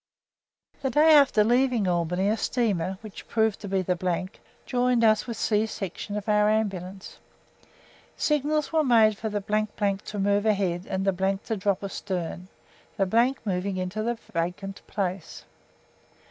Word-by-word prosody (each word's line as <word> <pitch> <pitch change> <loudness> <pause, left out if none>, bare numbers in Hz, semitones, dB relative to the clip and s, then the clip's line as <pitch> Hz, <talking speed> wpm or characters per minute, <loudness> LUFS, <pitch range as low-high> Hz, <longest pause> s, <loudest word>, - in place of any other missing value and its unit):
The 265 - 0
day 305 +5 +5
after 280 -7 +6
leaving 240 -2 +2
Albany 180 +2 0
a 215 - +2
steamer, 195 -7 -1
which 215 -3 -10
proved 220 -2 +1
to 205 - -7
be 190 -1 0
the, 180 0 -1 0.4
joined 245 -1 +1
us 215 0 +3
with 230 -3 -5
C 215 0 +1
Section 205 0 -5
of 210 +1 -6
our 210 0 +3
Ambulance. 195 -3 -3 1.0
Signals 300 +1 0
were 315 -1 +3
made 225 -5 +5
for 220 +1 -4
the 205 -1 -2 0.6
to 210 - -6
move 200 +2 +1
ahead 190 -4 0
and 190 0 -2
the 195 0 0
to 225 - -2
drop 200 -1 -1
astern, 185 -3 -4 0.5
the 230 +7 +2
moving 190 0 -2
into 185 +3 -3
the 235 +2 -1 0.2
vacant 180 +4 -3
place. 190 -3 -4
205 Hz, 145 wpm, -26 LUFS, 185-225 Hz, 1.0 s, after